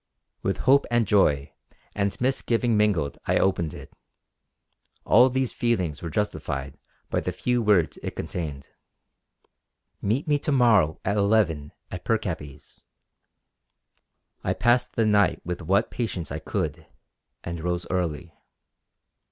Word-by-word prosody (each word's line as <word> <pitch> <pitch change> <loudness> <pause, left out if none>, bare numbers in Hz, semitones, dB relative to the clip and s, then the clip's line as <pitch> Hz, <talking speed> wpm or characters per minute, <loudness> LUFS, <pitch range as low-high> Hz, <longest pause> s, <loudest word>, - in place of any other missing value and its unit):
With - - -1
hope 140 +2 +5
and 120 -1 +2
joy 75 -9 +2 0.4
and 100 -1 -1
misgiving 120 -2 +1
mingled 100 -9 +1
I - - +3
opened 85 -5 +1
it. - - -11 1.1
All 125 +4 +6
these 130 -1 -1
feelings 95 - -1
were 85 - -4
justified 70 -9 -3 0.3
by - - +1
the 90 - -3
few 120 +7 0
words 100 -7 +2
it - - -5
contained: 75 -5 -5 1.3
"Meet 115 +10 0
me 145 -1 +2
to 150 - -2
morrow 115 - +4
at 100 +2 +1
eleven 100 -8 +2 0.2
at 90 - -6
Pircappies." 80 -10 -4 1.6
I - - 0
passed 120 +3 +2
the 115 - +2
night 105 -1 +3
with 90 0 -4
what 100 +6 +1
patience 95 -8 -3
I - - -3
could, 80 +1 -3 0.6
and 85 -1 -5
rose 90 0 -2
early. 85 -2 -2
100 Hz, 125 wpm, -25 LUFS, 80-115 Hz, 1.6 s, All